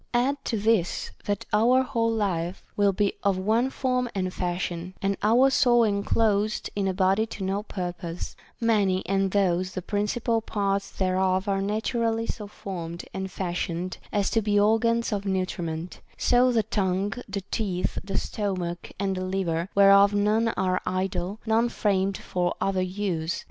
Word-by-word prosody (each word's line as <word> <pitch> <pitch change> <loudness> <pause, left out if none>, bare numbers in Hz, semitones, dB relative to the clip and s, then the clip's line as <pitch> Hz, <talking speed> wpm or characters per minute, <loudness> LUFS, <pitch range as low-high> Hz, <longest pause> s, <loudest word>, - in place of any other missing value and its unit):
Add 275 +3 +1
to 225 - -1
this, 210 -4 +1
that 205 -1 -2
our 245 +5 +4
whole 230 -3 0
life 190 -5 -1
will 205 -1 +3
be 200 +1 +1
of 200 -2 +2
one 220 +7 +2
form 255 -2 -1
and 185 -1 -1
fashion, 175 0 -3
and 195 0 0
our 245 +6 +5
soul 240 -3 +4
enclosed 210 0 +1
in 200 -1 0
a 190 - 0
body 195 +3 +2
to 205 - -6
no 195 +2 -1
purpose; 180 -4 -5 0.2
many 205 -5 +2
and 195 0 +1
those 185 -2 +1
the 185 - -3
principal 225 +3 0
parts 200 -2 -1
thereof 185 +1 0
are 195 -1 +1
naturally 225 +2 0
so 210 -2 -5
formed 170 -4 -6
and 190 0 -4
fashioned 180 -1 -3
as 205 -2 +1
to 225 - +2
be 205 -1 +2
organs 225 +2 +2
of 200 -1 -2
nutriment; 180 -3 -3 0.2
so 250 +1 +4
the 225 -3 +2
tongue, 195 0 0 0.2
the 200 0 -3
teeth, 185 -5 -1
the 195 0 -3
stomach, 185 -4 -3
and 195 -1 0
the 185 - -2
liver, 185 -2 -1
whereof 200 0 +6
none 210 +3 +2
are 185 -1 +1
idle, 185 +1 -2
none 225 +2 +2
framed 195 -3 0
for 175 -1 -2
other 195 -1 0
use. 185 -3 -2
200 Hz, 160 wpm, -26 LUFS, 185-220 Hz, 0.2 s, whereof